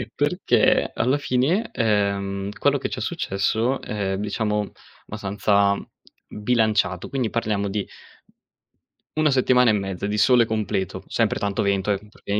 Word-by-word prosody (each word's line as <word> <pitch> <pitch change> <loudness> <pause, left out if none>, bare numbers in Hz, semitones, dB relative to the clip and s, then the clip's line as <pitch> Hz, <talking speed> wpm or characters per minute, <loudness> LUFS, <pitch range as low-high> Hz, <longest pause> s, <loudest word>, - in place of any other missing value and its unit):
perché - - +2
alla 130 +4 +1
fine, 145 - 0
ehm, 100 -3 0
quello - - +3
che - - -4
ci - - -5
è - - -5
successo 110 +6 -1
è 95 -2 -3
diciamo 105 0 -1 0.4
abbastanza 100 -1 +1 0.5
bilanciato, 105 -4 0
quindi 130 -4 -1
parliamo 105 -3 -1
di 100 0 -3 1.3
una 155 -1 +2
settimana 125 -2 +4
e - - +2
mezza, 95 -1 -3
di 105 +1 -2
sole 120 +1 +5
completo. 105 -4 -2
Sempre - - 0
tanto 100 -1 -1
vento, 100 0 +1
ehm, 105 +1 -4
perché 100 - -10
105 Hz, 135 wpm, -23 LUFS, 100-115 Hz, 1.3 s, sole